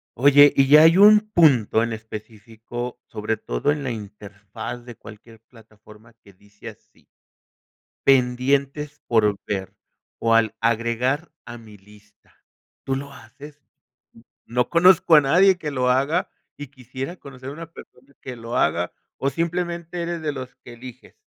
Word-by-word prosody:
Oye, 145 Hz, +3 st, +6 dB
y 135 Hz, -1 st, +3 dB
ya 150 Hz, +3 st, +7 dB
hay 165 Hz, +2 st, +5 dB
un 210 Hz, +1 st, +6 dB
punto 130 Hz, -10 st, +3 dB
en 115 Hz, 0 st, -2 dB
específico, 110 Hz, +2 st, -8 dB
sobre 110 Hz, 0 st, -3 dB
todo -, -, -2 dB
en 145 Hz, -1 st, -3 dB
la 135 Hz, -, -3 dB
interfaz 105 Hz, +2 st, -9 dB
de 120 Hz, -1 st, -11 dB
cualquier 110 Hz, +2 st, -15 dB
plataforma 110 Hz, -1 st, -20 dB
que 100 Hz, -, -19 dB
dice 100 Hz, +2 st, -13 dB
así: -, -, -20 dB, 1.0 s
"Pendientes 135 Hz, +3 st, +1 dB
por 105 Hz, -3 st, +2 dB
ver, 95 Hz, -2 st, -4 dB, 0.5 s
o 115 Hz, 0 st, +1 dB
al 115 Hz, -2 st, +2 dB
agregar 115 Hz, +7 st, -1 dB
a 120 Hz, -, -9 dB
mi 110 Hz, -3 st, -15 dB
lista", 105 Hz, +1 st, -23 dB, 0.5 s
¿tú 135 Hz, 0 st, -1 dB
lo 140 Hz, +1 st, -9 dB
haces?, 140 Hz, +4 st, -15 dB, 0.8 s
no 125 Hz, +1 st, -1 dB
conozco 170 Hz, -1 st, +5 dB
a 150 Hz, -, +7 dB
nadie 180 Hz, +7 st, +4 dB
que 155 Hz, -4 st, -5 dB
lo 125 Hz, -2 st, 0 dB
haga, 140 Hz, +8 st, 0 dB, 0.3 s
y 145 Hz, -, -9 dB
quisiera 130 Hz, +4 st, -8 dB
conocer 135 Hz, -5 st, -11 dB
a -, -, -8 dB
una 165 Hz, +2 st, -10 dB
persona 130 Hz, +3 st, -16 dB
que 130 Hz, -, -8 dB
lo 115 Hz, 0 st, -7 dB
haga, 85 Hz, +1 st, 0 dB, 0.2 s
o 140 Hz, -, -1 dB
simplemente 170 Hz, +1 st, -4 dB
eres 170 Hz, -1 st, -4 dB
de 155 Hz, -1 st, -2 dB
los 130 Hz, -2 st, -9 dB
que 120 Hz, -, -12 dB
eliges 120 Hz, 0 st, -13 dB
125 Hz, 150 wpm, -22 LUFS, 110-145 Hz, 1.0 s, ya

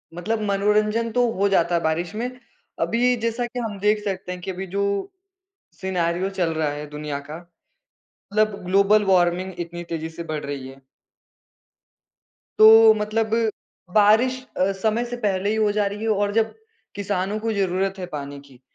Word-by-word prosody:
मतलब 215 Hz, +5 st, -2 dB
मनोरंजन 210 Hz, +3 st, +1 dB
तो 245 Hz, 0 st, +2 dB
हो 200 Hz, -, +3 dB
जाता 175 Hz, -2 st, +2 dB
है 170 Hz, -, +1 dB
बारिश 165 Hz, +4 st, -1 dB
में। 240 Hz, +3 st, -2 dB, 0.5 s
अभी 245 Hz, +2 st, +2 dB
जैसा 230 Hz, +1 st, -1 dB
कि 245 Hz, +1 st, -6 dB
हम 210 Hz, -4 st, -4 dB
देख 210 Hz, +1 st, +1 dB
सकते 190 Hz, -2 st, -4 dB
है 180 Hz, -, -5 dB
कि 190 Hz, -, -4 dB
अभी 190 Hz, +1 st, -6 dB
जो, 200 Hz, -, -2 dB, 0.7 s
सिनेरियो 180 Hz, 0 st, -1 dB
चल 180 Hz, -4 st, -1 dB
रहा 155 Hz, -1 st, 0 dB
है 150 Hz, +1 st, -6 dB
दुनिया 150 Hz, -1 st, -4 dB
का। 150 Hz, +2 st, -9 dB, 0.8 s
मतलब 215 Hz, -1 st, -2 dB
ग्लोबल 200 Hz, +3 st, +4 dB
वार्मिंग 185 Hz, 0 st, +2 dB
इतनी 175 Hz, 0 st, -5 dB
तेज़ी 165 Hz, -1 st, -5 dB
से 170 Hz, +1 st, -8 dB
बढ़ 155 Hz, -2 st, -4 dB
रही 140 Hz, -2 st, -5 dB
है। 135 Hz, 0 st, -13 dB, 1.8 s
तो, 220 Hz, 0 st, +9 dB
मतलब 215 Hz, +1 st, -1 dB, 0.6 s
बारिश 225 Hz, +5 st, +4 dB
अ, 190 Hz, +2 st, +2 dB
समय 220 Hz, +5 st, 0 dB
से 245 Hz, 0 st, -5 dB
पहले 200 Hz, -3 st, 0 dB
ही 220 Hz, -, 0 dB
हो 215 Hz, -1 st, +2 dB
जा 210 Hz, -1 st, +1 dB
रही 205 Hz, +2 st, -4 dB
है 225 Hz, -, -1 dB
और 205 Hz, -1 st, +1 dB
जब 225 Hz, 0 st, +1 dB, 0.4 s
किसानों 200 Hz, +1 st, -2 dB
को 225 Hz, 0 st, -1 dB
ज़रूरत 195 Hz, 0 st, -1 dB
है 180 Hz, -, -5 dB
पानी 140 Hz, -1 st, -6 dB
की, 135 Hz, -3 st, -19 dB
200 Hz, 170 wpm, -23 LUFS, 175-215 Hz, 1.8 s, तो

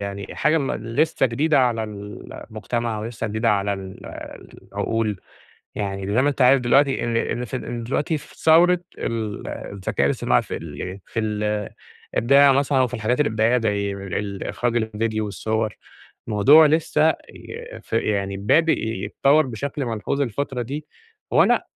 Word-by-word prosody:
يعني 100 Hz, 0 st, -6 dB
حاجة 155 Hz, +3 st, +2 dB
م 135 Hz, -3 st, -1 dB
لسّه 135 Hz, +5 st, +1 dB
جديدة 145 Hz, +6 st, +2 dB
على 120 Hz, -4 st, +2 dB
المجتمع 110 Hz, +2 st, -5 dB
ولسّه 115 Hz, +1 st, -4 dB
جديدة 110 Hz, +2 st, +1 dB
على 100 Hz, 0 st, +1 dB
ال 95 Hz, -1 st, -8 dB, 0.7 s
العقول، 105 Hz, -1 st, -1 dB, 0.5 s
يعني 100 Hz, -1 st, -3 dB
زي 130 Hz, -, +4 dB
ما 145 Hz, -, +3 dB
أنت 140 Hz, -2 st, 0 dB
عارف 130 Hz, +1 st, +6 dB
دلوقتي 135 Hz, +1 st, +3 dB
إن 115 Hz, -1 st, -1 dB
إن 120 Hz, +1 st, -1 dB
إن 120 Hz, -2 st, -4 dB
دلوقتي 150 Hz, +5 st, -1 dB
في 150 Hz, -, -15 dB
ثورة 175 Hz, +2 st, +5 dB, 0.2 s
ال 110 Hz, -3 st, -3 dB
الذكاء 100 Hz, -1 st, -2 dB
الاصطناعى -, -, +2 dB
في -, -, -5 dB
ال 85 Hz, +5 st, -7 dB
في 115 Hz, -, -3 dB
ال 105 Hz, -1 st, -1 dB, 0.5 s
الإبداع 140 Hz, +3 st, +6 dB
مثلًا 135 Hz, 0 st, +2 dB
وفي 125 Hz, -1 st, +1 dB
الحاجات 120 Hz, +3 st, 0 dB
الإبداعية 110 Hz, -1 st, +2 dB
زي 100 Hz, -3 st, -1 dB
ال 100 Hz, +1 st, -4 dB
إخراج 120 Hz, -2 st, 0 dB
الڤيديو 110 Hz, 0 st, -2 dB
والصور. 110 Hz, +1 st, -2 dB, 0.5 s
الموضوع 140 Hz, +10 st, +7 dB
لسّه 155 Hz, 0 st, +3 dB
ي -, -, -9 dB
ف -, -, -24 dB
يعني 100 Hz, -2 st, 0 dB
بادىء 160 Hz, +12 st, +3 dB
يتطور 135 Hz, +8 st, +2 dB
بشكل 135 Hz, +4 st, -4 dB
ملحوظ 115 Hz, +4 st, -2 dB
الفترة 135 Hz, 0 st, -2 dB
دي، 145 Hz, +5 st, -6 dB, 0.4 s
وأنا -, -, +4 dB
115 Hz, 145 wpm, -22 LUFS, 105-140 Hz, 0.7 s, الموضوع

